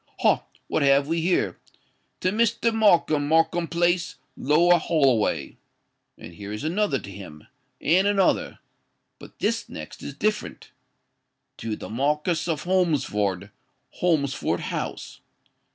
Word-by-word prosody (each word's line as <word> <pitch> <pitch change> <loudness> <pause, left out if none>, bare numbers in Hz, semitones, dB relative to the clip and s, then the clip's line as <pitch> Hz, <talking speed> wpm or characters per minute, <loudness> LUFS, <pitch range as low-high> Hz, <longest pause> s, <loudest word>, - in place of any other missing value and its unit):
Ha! - - +3 0.2
what - - -1
have 140 0 +4
we 165 +1 0
here? 180 +2 0 0.6
'To 185 - +1
Mr. 230 +1 +1
Markham, 175 -9 +3
Markham 165 +2 +2
Place, 175 +1 0 0.2
Lower 170 +5 +4
Holloway.'—And 115 - -2
here 100 +3 -8
is 105 +4 -5
another 170 -1 0
to 100 - -9
him—and 100 - -2
another.—But 195 -2 -3
this - - -1
next 75 - -9
is 140 - -7
different. 210 +4 -3 0.9
'_To 110 -1 -4
the - - -8
Marquis 150 +8 0 0.2
of 155 -2 -3
Holmesford, 125 - 0 0.5
Holmesford 155 -6 0
House. - - -5
155 Hz, 110 wpm, -24 LUFS, 125-180 Hz, 0.9 s, have